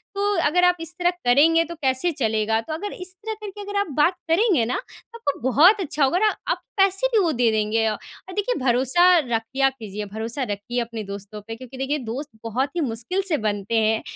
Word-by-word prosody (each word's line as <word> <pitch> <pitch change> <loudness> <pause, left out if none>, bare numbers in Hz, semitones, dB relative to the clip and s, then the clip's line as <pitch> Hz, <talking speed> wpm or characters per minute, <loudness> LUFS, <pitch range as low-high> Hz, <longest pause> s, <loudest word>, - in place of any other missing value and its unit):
तो 400 0 0 0.2
अगर 360 +5 +2
आप 360 0 +5
इस 330 +1 -4
तरह 350 - +3 0.2
करेंगे 310 +7 +5
तो 340 +1 -8
कैसे 275 +2 +1
चलेगा? 220 -4 0
तो 310 - -6
अगर 405 +6 -4
इस 365 0 -6
तरह 440 +3 -5
करके 415 -1 -7
अगर 405 0 -2
आप 405 - 0
बात 305 +5 +4 0.2
करेंगे 355 - +3
ना 245 - -1
तो 465 - -12
आपको 285 -12 -2
बहुत 360 - +6
अच्छा 300 -4 -1
होगा 270 +6 +3
औ - - -5
अगर 435 - +5 0.2
आप - - -2 0.2
पैसे 390 +4 +3
भी 445 - +5
वो 330 - +2
दे 240 -4 +2
देंगे 215 +1 +1
अ 220 - +1
अ, 375 - -12
देखिए 415 +4 0
भरोसा 260 +7 +3
रखिया 250 0 0
कीजिए। 210 -5 -7
भरोसा 220 +6 -4
रखिए 210 +2 -3
अपने 230 -2 -5
दोस्तों 200 +1 -8
पे 225 - -5
क्योंकि 255 +2 -11
देखिए 270 +3 -1
दोस्त 255 +5 -5
बहुत 245 +5 -1
ही 345 - 0
मुश्किल 245 - -1
से 310 - +2
बनते 205 0 -2
हैं 220 0 +2
270 Hz, 220 wpm, -23 LUFS, 225-355 Hz, 0.2 s, बहुत